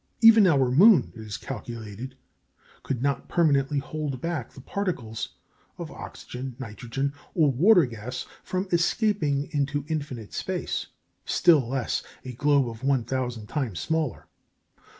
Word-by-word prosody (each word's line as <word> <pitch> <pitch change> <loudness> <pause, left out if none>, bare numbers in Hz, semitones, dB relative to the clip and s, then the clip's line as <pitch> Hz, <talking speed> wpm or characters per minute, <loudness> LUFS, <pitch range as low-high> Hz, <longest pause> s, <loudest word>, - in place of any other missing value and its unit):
Even 225 -3 +8
our 135 -7 +3
moon, 180 - +6
it 115 - -9
is 105 -2 -5
calculated, 115 +1 -7 0.6
could 125 -2 -3
not 140 -1 0
permanently 145 -4 +2
hold 145 -2 -3
back 160 -5 -3
the - - -13
particles 135 - -3 0.4
of - - -6
oxygen, 125 0 -7
nitrogen, 130 +3 -4 0.2
or 155 -5 +4
water 175 - +6
gas 120 +2 -6 0.2
from 185 +1 -2
escaping 170 -5 +1
into 145 -1 -1
infinite 140 -9 -4
space; - - -3 0.4
still 155 -9 +4
less, 135 -2 -1 0.2
a 130 - -5
globe 130 -3 +1
one 135 -2 +2
thousand 120 -2 -3
times 115 - -3
smaller. 160 - -1
135 Hz, 130 wpm, -26 LUFS, 120-155 Hz, 0.6 s, Even